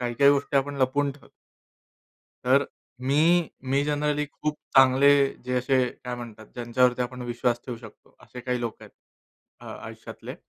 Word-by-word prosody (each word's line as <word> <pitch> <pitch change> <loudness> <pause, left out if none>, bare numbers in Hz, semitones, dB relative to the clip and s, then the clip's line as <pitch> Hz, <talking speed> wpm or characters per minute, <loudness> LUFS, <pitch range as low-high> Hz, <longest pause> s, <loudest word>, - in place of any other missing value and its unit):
काही-काही 125 +3 +4
गोष्टी 140 0 +1
आपण 140 +1 0
लपवून 140 +2 +1
ठेवतो. 140 - -19 1.1
तर, 135 +3 +4 0.3
मी 160 +6 +3 0.2
मी 140 +1 +3
जनरली 150 0 0
खूप 150 +1 -4 0.2
चांगले, 135 +1 +6 0.4
जे 125 0 -2
असे 130 +2 +1 0.3
काय 125 - -3
म्हणतात, 115 -3 -9
ज्यांच्यावरती 125 +1 +2
आपण 125 0 -5
विश्वास 120 0 -1
ठेवू 125 - -4
शकतो, 110 -2 -15
असे 125 - -10
काही 125 0 -2
लोक 115 -2 -3
आहेत, - - -13 0.7
अ - - -12 0.2
आयुष्यातले. - - -9
130 Hz, 150 wpm, -26 LUFS, 120-140 Hz, 1.1 s, चांगले